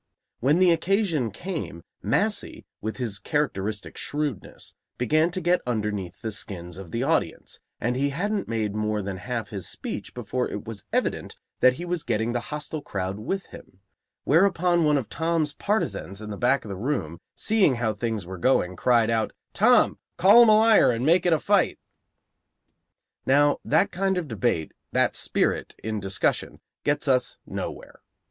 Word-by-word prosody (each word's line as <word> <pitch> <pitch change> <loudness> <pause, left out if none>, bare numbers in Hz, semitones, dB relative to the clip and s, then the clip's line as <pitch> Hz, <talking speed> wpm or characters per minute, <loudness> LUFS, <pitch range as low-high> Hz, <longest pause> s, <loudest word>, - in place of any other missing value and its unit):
When 140 +6 +3
the 180 -1 +5
occasion 170 - +1
came, 130 - -6 0.2
Massey, - - 0 0.2
with 110 +1 -4
his 115 -6 -2
characteristic 110 -9 -2
shrewdness, 145 -7 -4 0.2
began 155 +7 +2
to 180 - -3
get 180 +1 +2
underneath 105 -6 -3
the 110 - -2
skins 90 -4 -5
of 95 -3 -9
the - - -2
audience, - - -1 0.2
and 120 +2 -1
he 140 +2 +1
hadn't 200 +8 -2
made 110 -3 -1
more 105 -1 -1
than 95 -1 -4
half 120 +3 -4
his 100 -3 -6
speech - - -6
before - - -2
it - - -6
was - - -8
evident - - -1 0.2
that 130 0 +6
he 175 - -6
was 175 -1 -2
getting 115 -2 -1
that 120 0 -3
hostile 150 +1 -4
crowd 95 -4 -4
with 190 - -3
him; 90 - -13 0.4
whereupon 175 +1 +3
one 150 -1 +4
of 130 -6 -3
Tom's 160 +1 -1
partisans 200 - -2
in 105 -1 -7
the - - -4
back 125 +5 +1
of - - -8
the 100 - -4
room, 95 - -2 0.2
seeing 210 - +3
how 115 -2 0
things 110 -2 -3
were 95 0 -8
going, 90 -6 +2
cried 115 +3 +3
out: 110 -1 0 0.2
"Tom, - - +4 0.2
call 200 +7 +8
him 235 - +7
a 215 - +7
liar 220 0 +6
and 120 +1 0
make 170 +3 +5
it - - +3
a - - +4
fight!" 200 +3 +2 1.5
Now, 145 +2 +4
that - - +2
kind 190 +1 0
of 175 -4 -2
debate, 110 - -1 0.2
that - - +2
spirit - - 0
in 110 -1 -2
discussion, 95 0 -1 0.2
gets 145 +1 0
us 130 -2 +1
nowhere. - - -7
125 Hz, 170 wpm, -25 LUFS, 105-165 Hz, 1.5 s, call